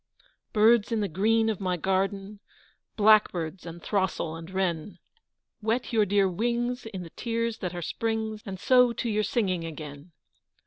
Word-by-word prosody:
BIRDS 220 +1 +4
in 225 - +1
the 205 - 0
green 220 +6 +2
of 220 -4 -1
my 185 -2 -1
garden 195 +3 -1 0.6
Blackbirds 190 -5 +3
and 170 0 -9
throstle 190 -5 -1
and 165 +1 -9
wren, 185 -1 -2 0.6
Wet 230 +3 -1
your 215 -2 +3
dear 200 0 +3
wings 240 +5 -1
in 190 -5 -6
the 165 - -11
tears 230 -1 -2
that 180 -1 -4
are 175 - -4
Spring's 220 +2 -2
And 190 -1 -6
so 250 +3 +5
to 235 - -3
your 215 -1 +1
singing 195 -5 0
again! 155 0 -8
200 Hz, 160 wpm, -27 LUFS, 180-225 Hz, 0.6 s, so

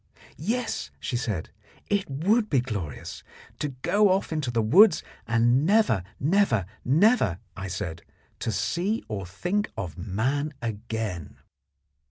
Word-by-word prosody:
Yes, 225 - -2
she 75 - -3
said, 110 -9 -2 0.4
it 200 -4 0
would 205 - +2
be 135 - +3
glorious. 100 - -5 0.4
To - - 0 0.2
go 205 0 +4
off 185 -3 +1
into 150 -5 -1
the 115 -2 +1
woods, 180 - +6 0.2
and 120 +3 +3
never, 205 - +3 0.2
never, 150 - +2 0.2
never, 155 - +4 0.2
I 95 - -5
said, 90 -3 -4 0.4
see 175 - -1
or 100 -4 -4
think 180 - -1
of 90 -4 -5
man 130 +11 -1
again. 110 - -4
125 Hz, 125 wpm, -26 LUFS, -, 0.4 s, woods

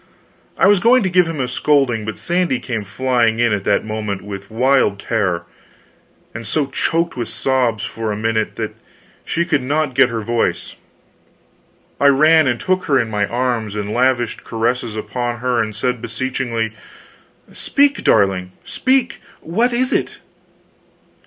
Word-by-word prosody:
I - - +4
was 200 0 +5
going 240 +3 +4
to 190 - -1
give 180 -1 +4
him 165 -3 -4
a 130 - 0
scolding, 125 -4 +1
but 110 - -5
Sandy 175 -7 0
came 115 -4 -4
flying 115 +2 +1
in 120 -2 +2
at 100 -2 -2
that - - +1
moment, 105 -2 -4 0.3
wild 130 -1 +2
with 100 - -18
terror, 95 -7 -1 0.9
and 110 0 -7
so 150 +6 0
choked 165 +4 -1
with 120 -3 -3
sobs 125 -5 0
that - - -5
for 115 -1 -3
a 105 - -3
minute 110 0 -1 0.7
she 170 +1 -1
could 155 -5 +1
not 145 +2 -1
get 135 0 +4
her 115 -2 -3
voice. 115 +2 -1 1.2
I 140 - +4
ran 155 +2 +5
and 120 -2 0
took 185 0 0
her 140 -4 +3
in 115 -2 -2
my 105 -1 0
arms, 120 -4 -2
and 105 0 -3
lavished 120 -1 +1
caresses 115 0 -2
upon 120 +2 -3
her 125 0 0
and 110 -1 -4
said, 125 +2 -2
beseechingly: 115 -2 -3 0.8
"Speak, 285 0 +1
darling, 95 -2 +2
speak! 260 -2 0 0.2
What 225 +10 0
is 255 +2 0
it?" - - -1
125 Hz, 160 wpm, -18 LUFS, 110-150 Hz, 1.2 s, was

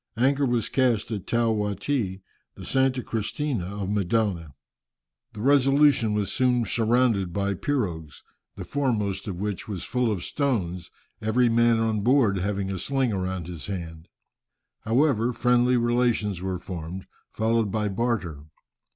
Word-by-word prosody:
Anchor 135 +3 +2
was 120 -2 0
cast 120 -5 +1
at 100 -4 -4
Tao 115 -1 +2
Wati, 105 -1 -2 0.3
the - - -9
Santa 130 -1 +1
Cristina 115 0 -2
of 100 +1 -5
Mendana. 100 - -1 0.8
The 105 - -7
Resolution 135 -3 +4
was 100 -2 -1
soon 125 -2 +2
surrounded 115 -5 +1
by 100 +2 -1
pirogues, 90 - -3 0.3
the - - -7
foremost 110 -10 -1
of 100 - -3
which 100 +1 -4
was 95 -5 -5
full 125 -1 0
of 95 -5 -3
stones, 95 - -2 0.3
every 120 +3 +2
man 115 0 +4
on 110 -2 0
board 115 -4 +3
having 100 0 -2
a 95 - -4
sling 135 +1 0
round 95 -2 -3
his 85 -3 -7
hand. 85 -4 -6 0.8
However, 125 0 +2
friendly 125 +1 +3
relations 120 -5 +1
were 95 -1 -2
formed, 90 0 -7 0.2
followed 110 -1 0
by 105 0 0
barter. 95 -8 -2
110 Hz, 140 wpm, -25 LUFS, 95-125 Hz, 0.8 s, Resolution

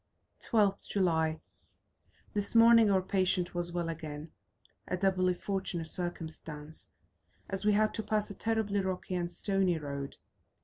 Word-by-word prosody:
12th 205 -4 +1
July. 160 -5 +1 0.9
This 205 +1 -1
morning 230 -1 +7
our 190 -2 +3
patient 185 -1 +1
was 175 0 -1
well 175 -1 -2
again; 155 -1 -6 0.6
a 180 - -1
doubly 185 -1 +2
fortunate 190 -3 -3
circumstance, 160 -3 -6 0.6
as 195 +1 -4
we 210 - +5
had 215 +1 +3
to 220 - -2
pass 215 -1 0
a - - -5
terribly 215 -1 0
rocky 185 -1 -3
and 175 -1 -1
stony 190 -1 +1
road. 140 -2 -5
185 Hz, 135 wpm, -31 LUFS, 165-200 Hz, 0.9 s, morning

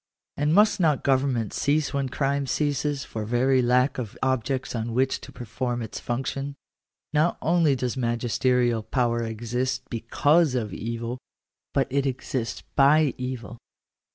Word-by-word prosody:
And 150 +1 +1
must 210 +1 +5
not 155 -6 +2
government 130 -5 +1
cease 150 +1 +1
when 140 -2 -1
crime 140 +1 0
ceases, 145 0 -1
for 110 - -5
very 125 +4 +2
lack 125 +2 +2
of 115 -5 -6
objects 130 0 -1
on 115 -1 -3
which 130 +1 +1
to - - -10
perform 120 +1 -3
its 110 - -6
function? 135 +3 -3 0.6
Not 155 +3 +2
only 165 -4 +3
does 125 -1 -2
magisterial 120 -1 +1
power 120 0 0
exist 120 +3 -2
because 145 +6 +2
of 110 -5 -2
evil, 115 +2 -4 0.5
but 135 - +2
it 140 0 +1
exists 125 -2 -3
by 145 +1 +5
evil. 125 -2 -5
130 Hz, 140 wpm, -25 LUFS, 120-140 Hz, 0.6 s, must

